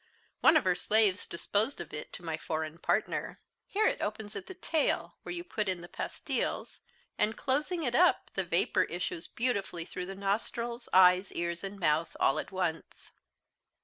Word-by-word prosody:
One 315 - +7
of 305 - +2
her 185 - +3
slaves 205 +1 +2
disposed 210 +9 0
of 175 - -7
it 150 - -6
to 175 - -4
my 160 -1 -1
foreign 160 0 -4
partner. - - -1 0.3
Here 430 +2 +1
it - - +1
opens 215 0 -4
at - - -6
the 380 - -8
tail, 320 -3 0
where - - -7
you 350 0 -4
put 215 - -1
in 180 -2 -2
the 175 - -9
pastiles, - - -3 0.4
and 215 +1 +1
closing 300 +6 0
it 245 -4 0
up, 355 +8 +4
the - - 0
vapour - - +2
issues 355 -3 -4
beautifully 200 -8 -1
through 180 0 -5
the 195 - -6
nostrils, 230 +4 -2
eyes, 185 +1 +6
ears, 170 +1 -2
and 195 +1 -6
mouth, 160 -1 +1
all 135 - +3
at - - -6
once. 180 -4 -3
200 Hz, 180 wpm, -31 LUFS, 175-245 Hz, 0.4 s, One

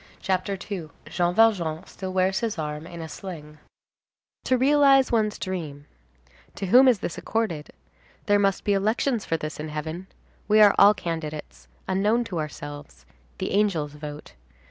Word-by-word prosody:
CHAPTER 190 0 -1
II—JEAN 175 -1 -3
VALJEAN 185 -7 +2
STILL 190 -1 -7
WEARS 190 +1 +1
HIS 225 -4 -2
ARM 150 0 -4
IN 170 -2 -8
A - - -6
SLING 155 -1 -9 0.9
To 255 - +2
realize 275 0 +4
one's 215 -3 +1
dream. 155 -7 -5 0.7
To - - -4
whom 250 +8 +6
is 250 -4 +5
this 170 - -4
accorded? 205 -10 -2 0.6
There 205 -2 +3
must 195 -1 +1
be 205 - +2
elections 220 +4 0
for 165 - 0
this 155 -1 -6
in 155 +1 -5
heaven; 160 +4 -5 0.4
we 215 +1 +4
are 205 -1 +8
all 205 +1 +7
candidates, 155 - -6 0.2
unknown 210 +5 +2
to 180 -7 -4
ourselves; 145 -1 -8 0.3
the - - -3
angels 185 -8 +1
vote. 150 0 -9
185 Hz, 150 wpm, -25 LUFS, 155-210 Hz, 0.9 s, are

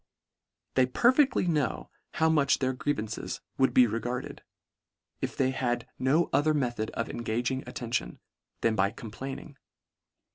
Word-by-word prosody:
They 130 -1 +4
perfectly 255 - +3
know 150 -7 -1 0.2
how 160 - +2
much 155 -2 +3
their 130 -1 0
grie 145 +3 -1
vances 110 -1 -4 0.2
would 130 - +4
be 125 - +6
regarded, 120 +2 -3 0.8
if - - -3
they 130 -1 +2
had 120 -2 -1
no 145 +6 +3
o 140 - +5
ther 155 +1 +2
method 120 -6 -1
of 115 - -1
engaging 120 +3 -2
attention, 115 - -3 0.4
than 115 - +3
by 95 -1 +3
complaining. 135 +6 -8
130 Hz, 140 wpm, -29 LUFS, 115-145 Hz, 0.8 s, be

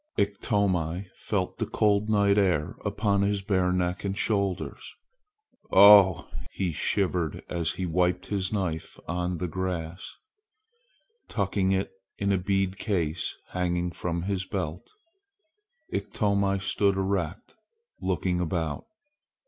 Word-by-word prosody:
Iktomi 95 -3 0
felt 95 -4 -2
the - - -1
cold 105 0 +2
night 100 -1 +4
air 85 -7 +1
upon 100 -1 +1
his 100 0 0
bare 95 -2 +1
neck 90 0 -1
and 100 0 -2
shoulders. 100 -5 -1 0.8
"Ough!" 100 -2 +8 0.2
he 95 -3 -2
shivered 90 -1 -1
as 85 -2 -1
he 95 - -3
wiped 90 +2 +1
his 95 -2 -1
knife 90 -7 -3
on 90 0 -2
the 90 - -2
grass. 90 0 -4 1.2
Tucking 100 -2 0
it 95 0 0 0.3
in 100 0 0
a 95 - +2
beaded 95 0 0
case 85 -6 -1
hanging 90 -1 -1
from 85 0 -3
his 95 0 -1
belt, 90 -2 -4 1.0
Iktomi 100 -2 0
stood 100 0 +1
erect, 95 -5 -2 0.5
looking 90 -1 0
about. 80 -3 -2
95 Hz, 115 wpm, -27 LUFS, 90-100 Hz, 1.2 s, Ough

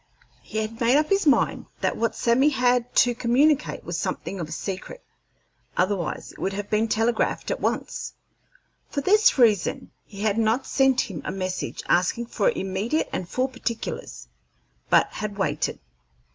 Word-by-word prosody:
He - - -7
had 220 +2 -3
made 240 +4 +4
up 305 0 +1
his 395 -4 +2
mind 280 - +2
that - - +1
what 230 -1 -1
Sammy 250 +5 +3
had 250 -3 +1
to 245 - +5
communicate 265 +6 +2
was - - -4
something 195 - -3
of 160 -3 -4
a - - -10
secret, 190 - -6 0.7
otherwise 180 -2 -1
it - - -16
would 195 - -1
have 205 +1 -5
been 215 +1 +2
telegraphed 225 +1 0
at - - -2
once. - - -2 0.8
For 285 - -2
this 420 +6 +4
reason 220 -8 +2
he 200 -1 -11
had 215 0 +1
not 225 +4 +1
sent 265 -1 +3
him 175 -7 -6
a - - -4
message 185 -1 -4
asking 185 +7 +2
for - - +1
immediate 205 - -1
and 180 -1 -3
full 255 +5 0
particulars, 240 - -5 0.6
but - - +5
had 210 -1 -5
waited. 150 -6 -1
230 Hz, 160 wpm, -25 LUFS, 195-260 Hz, 0.8 s, to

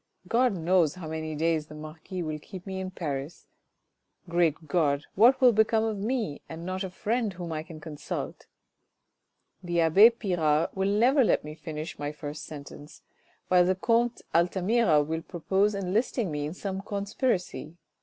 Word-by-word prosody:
God 245 +3 +3
knows 170 -2 +2
how 180 -3 -7
many 160 0 -4
days 160 0 0
the 155 - -11
marquis 160 +4 -7
will 155 -1 -4
keep 185 +3 -10
me 190 -1 -4
in 190 0 -4
Paris. 150 -4 -5 0.8
Great 165 -2 +1
God, 145 -2 +1
what 240 +6 +5
will 255 -2 +7
become 220 0 +3
of 220 -2 -2
me, 220 - -2
and 165 +1 -7
not 185 +1 -3
a 190 - -4
friend 220 +3 -1
whom 175 -2 -6
I 155 -1 -2
can 160 0 -11
consult? 150 -1 -6 1.1
The 175 -2 0
abbe 190 +8 +7
Pirard 170 -9 0
will 190 +1 0
never 250 +7 +4
let - - +2
me 150 0 -7
finish 155 0 -7
my 145 0 -3
first 150 0 -7
sentence, 145 0 -11 0.4
while 180 -1 +5
the 185 +1 +2
comte 235 +4 +1
Altamira 180 0 +3
will 160 +2 -3
propose 190 +5 0
enlisting 200 +1 -1
me 145 0 -2
in 160 - -7
some 190 0 -4
conspiracy. 200 - -2
175 Hz, 165 wpm, -28 LUFS, 155-205 Hz, 1.1 s, will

